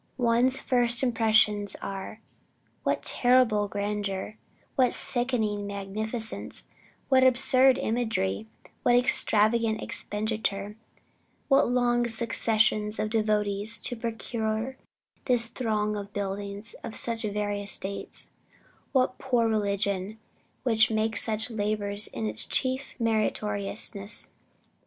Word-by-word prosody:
One's 245 +1 +2
first 245 0 +1
impressions 215 -4 +2
are, 195 +3 -6 0.6
what - - -1
terrible 245 -5 +3
grandeur; 205 0 -3 0.4
what 255 -2 +3
sickening 220 -5 -1
magnificence; 215 +3 -5 0.5
what 260 -1 +5
absurd 260 +1 +5
imagery; 110 - -1 0.3
what 240 - +4
extravagant 225 -2 +3
expenditure; 210 -1 -2 0.7
what 275 -3 +4
long 240 -1 +2
successions 220 -2 +1
of 215 0 -2
devotees 215 0 +1
to 245 - 0
procure 225 +1 -3 0.5
this 245 -3 +5
throng 215 -3 -1
of 205 0 -7
buildings 200 +1 -5
of 225 - -6
such 230 -1 -2
various 205 -1 -1
dates; 195 +1 -6 0.6
what 255 -2 +4
a 255 - -21
poor 245 -3 +2
religion 200 -1 -1 0.5
which 225 -4 +3
makes 220 0 0
such 220 +1 -2
labors 205 -1 0
its 110 -1 -2
chief 260 +1 -1
meritoriousness! 210 -2 -1
220 Hz, 100 wpm, -27 LUFS, 205-240 Hz, 0.7 s, what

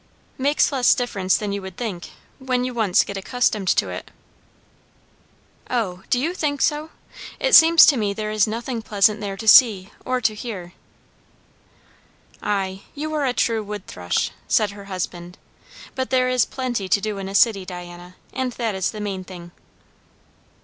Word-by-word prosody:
"Makes 285 +4 +2
less 260 -3 +4
difference 195 -7 0
than 210 -1 -4
you 200 0 -3
would 190 -1 -9
think, 200 -8 -5 0.3
when 255 -2 -1
you 255 0 -3
once 215 -6 +3
get 200 - -6
accustomed 215 -1 -1
to - - +2
it." - - -7 1.6
"O, 200 -7 -2
do 245 - +2
you 320 +7 -1
think 295 -6 -2
so! 300 +3 0 0.5
It - - 0
seems 330 0 +9
to 285 - +4
me 210 -3 0
there 215 +1 -4
is 215 -1 +2
nothing 230 +2 -4
pleasant 210 0 +2
there 200 -1 -4
to 220 - -7
see 210 -5 +6
or 255 0 -1
to 225 -3 +1
hear." 205 -6 -7 1.7
"Ay, 195 -2 -2
you 310 +2 -4
are 300 -2 0
a 255 - 0
true 230 -3 0
wood 210 -2 -7
thrush," 90 -1 -2 0.2
said 210 -2 +2
her 200 0 -11
husband. 180 -2 -6 0.6
"But 260 -1 -3
there 255 -1 +2
is 255 -2 +2
plenty 240 -7 -4
to 200 - +3
do 210 0 -4
in 195 0 -5
a 195 - -6
city, 200 -2 +4
Diana; 175 0 -10 0.2
and 255 -1 -2
that 230 -3 -2
is 190 -1 -1
the 215 - -7
main 195 -2 -4
thing." 175 -2 -11
215 Hz, 170 wpm, -22 LUFS, 190-255 Hz, 1.7 s, seems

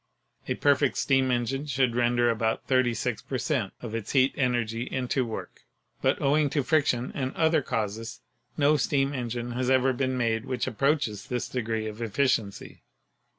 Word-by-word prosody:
A - - -1
perfect 140 -1 +2
steam 135 -1 +2
engine 130 +4 -1
should 130 -4 +1
render 120 0 +2
about 110 0 -1
36 120 -3 +1
per 130 +1 -4
cent, 125 - -1
of 115 -2 -6
its 115 -2 -4
heat 135 -1 +4
energy 120 -4 0
into 130 0 -1
work, 115 -2 -7 0.4
but - - +2
owing 145 +1 +2
to 145 0 0
friction 130 -4 +1
and 130 -1 -3
other 160 -1 +3
causes 110 -1 -4 0.4
no 150 +1 +4
steam 140 0 +1
engine 120 -2 -3
has 125 +1 -1
ever 130 0 +3
been 130 0 -1
made 115 -1 0
which 125 -3 -2
approaches 130 -4 0
this 125 -1 -2
degree 110 -3 -2
of 110 +1 -6
efficiency. 115 -3 -1
125 Hz, 160 wpm, -27 LUFS, 115-135 Hz, 0.4 s, heat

